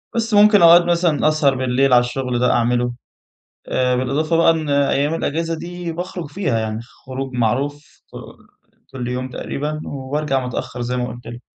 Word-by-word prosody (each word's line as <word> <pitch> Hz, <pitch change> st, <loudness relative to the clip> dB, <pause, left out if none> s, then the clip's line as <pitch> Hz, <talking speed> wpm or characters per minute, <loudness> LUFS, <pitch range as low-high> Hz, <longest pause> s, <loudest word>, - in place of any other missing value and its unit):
بس 225 Hz, -1 st, -1 dB
ممكن 205 Hz, 0 st, +6 dB
أقعد 170 Hz, +1 st, +7 dB
مثلًا 170 Hz, -3 st, +1 dB
أسهر 155 Hz, -3 st, +2 dB
بالليل 130 Hz, +1 st, +1 dB
على 125 Hz, -, +8 dB
الشغل 125 Hz, 0 st, -2 dB
ده 125 Hz, 0 st, +3 dB
أعمله. 120 Hz, +1 st, +1 dB, 0.8 s
آآ، 125 Hz, 0 st, +1 dB
بالإضافة 145 Hz, +6 st, 0 dB
بقى 165 Hz, 0 st, +5 dB
إن 160 Hz, -2 st, -1 dB
أيّام 140 Hz, +2 st, +1 dB
الإجازة 165 Hz, +1 st, -2 dB
دي 175 Hz, +1 st, -6 dB
باخرج 175 Hz, 0 st, -5 dB
فيها 145 Hz, -, -1 dB
يعني، 110 Hz, 0 st, -3 dB
خروج 130 Hz, +2 st, -8 dB
معروف 140 Hz, +6 st, -2 dB
ك -, -, -10 dB, 0.8 s
كل 125 Hz, -2 st, -5 dB
يوم 125 Hz, +1 st, -3 dB
تقريبًا، 150 Hz, +4 st, -4 dB
وارجع 135 Hz, -1 st, -2 dB
متأخّر 125 Hz, 0 st, -5 dB
زي 125 Hz, +1 st, -2 dB
ما 125 Hz, 0 st, -1 dB
قُلت 120 Hz, +2 st, -10 dB
لك. 120 Hz, +1 st, -9 dB
135 Hz, 165 wpm, -20 LUFS, 125-165 Hz, 0.8 s, على